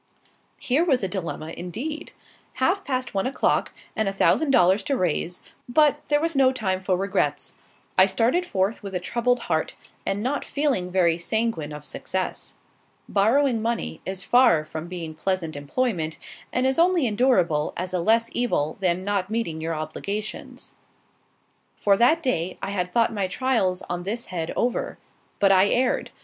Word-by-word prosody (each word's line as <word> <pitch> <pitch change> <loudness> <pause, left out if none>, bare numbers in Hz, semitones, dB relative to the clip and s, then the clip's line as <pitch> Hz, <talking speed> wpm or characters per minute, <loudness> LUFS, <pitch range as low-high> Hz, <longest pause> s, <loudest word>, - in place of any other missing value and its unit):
Here 275 +6 +1
was 270 - +2
a - - +1
dilemma, 170 -4 -5
indeed. 275 - -5 0.4
Half 355 +10 +1
past 255 -4 -2
one 195 +4 0
o'clock, 270 - +1 0.2
and 220 -2 +1
a - - -2
thousand 285 +9 +2
dollars 190 -5 +4
to 275 - 0
raise; 175 -1 -1 0.3
but 295 +2 +3
there 295 0 +3
was 330 0 -1
no 265 -1 +5
time 190 -7 -2
for 185 -1 +1
regrets. 195 +2 -1 0.5
I 185 - +8
started 230 - +2
forth 200 - -1
with 195 -2 -7
a - - +1
troubled 240 +6 0
heart, 160 -5 -1 0.3
and 200 +2 -2
not 280 +4 -1
feeling 275 -11 0
very 175 -2 +2
sanguine 220 -5 -1
of 150 0 -8
success. 190 +4 -4 0.5
Borrowing 230 +4 +2
money 230 +1 -2
is 190 0 -4
far 245 -11 +4
from 155 +2 -6
being 170 -3 -6
pleasant 165 -1 -2
employment, 160 - -2 0.3
and 255 - 0
is 265 +4 +1
only 345 -3 +4
endurable 205 - +2
as 180 +1 -4
a 180 - +1
less 230 +5 +2
evil 155 -11 0
than 185 -1 0
not 200 -2 -1
meeting 215 -8 -2
your 165 0 -2
obligations. 200 +8 -5 1.0
For 200 -1 +3
that 315 +9 +4
day, 185 - -1
I 195 - -4
had 180 -2 -2
thought 230 -1 +2
my 200 -3 -1
trials 190 -4 0
on 175 0 -3
this 220 +6 -4
head 165 -2 -2
over; 245 0 -1 0.4
but 195 -1 +4
I 190 +1 +5
erred. 250 +4 +1
200 Hz, 165 wpm, -24 LUFS, 180-255 Hz, 1.0 s, I